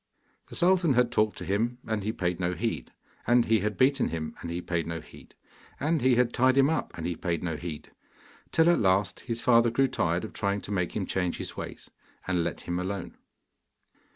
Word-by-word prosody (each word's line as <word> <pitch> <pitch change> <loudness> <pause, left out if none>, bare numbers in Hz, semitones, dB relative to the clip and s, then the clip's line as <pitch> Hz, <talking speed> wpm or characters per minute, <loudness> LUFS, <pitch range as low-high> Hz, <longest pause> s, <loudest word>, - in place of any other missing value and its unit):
The - - -11
sultan 180 -4 +3
had 125 -1 +3
talked 110 -2 +1
to - - -6
him, 115 +5 0
and 110 -2 -1
he 110 - 0
paid 90 -4 -2
no 90 0 0
heed; 85 - -3 0.4
and 120 0 +5
he 110 -1 +3
had 105 +1 -2
beaten 135 +1 +3
him, 80 -1 -4
and 85 - -5
he 85 +1 -3
paid 85 -2 -2
no 85 0 -3
heed; 75 - -16 0.4
and 155 +2 +1
he 130 0 +4
had 120 -1 +2
tied 130 +2 +3
him 135 +3 +5
up, 160 - -1
and 80 - -4
he 85 - -1
paid 85 0 -2
no 85 -3 -2
heed, 80 -1 -7 0.6
till 165 0 +4
at 175 - +3
last 95 -1 +2
his 115 -1 -4
father 120 -1 +5
grew 135 +4 +2
tired 85 -8 0
of 110 - -7
trying 100 -1 -1
to - - -7
make 90 -3 -1
him 100 - -1
change 90 -2 -1
his - - -5
ways, - - -8 0.4
and 90 -2 +1
let 85 - -3
him 85 0 -3
alone. 95 0 -4
100 Hz, 215 wpm, -28 LUFS, 85-125 Hz, 0.6 s, and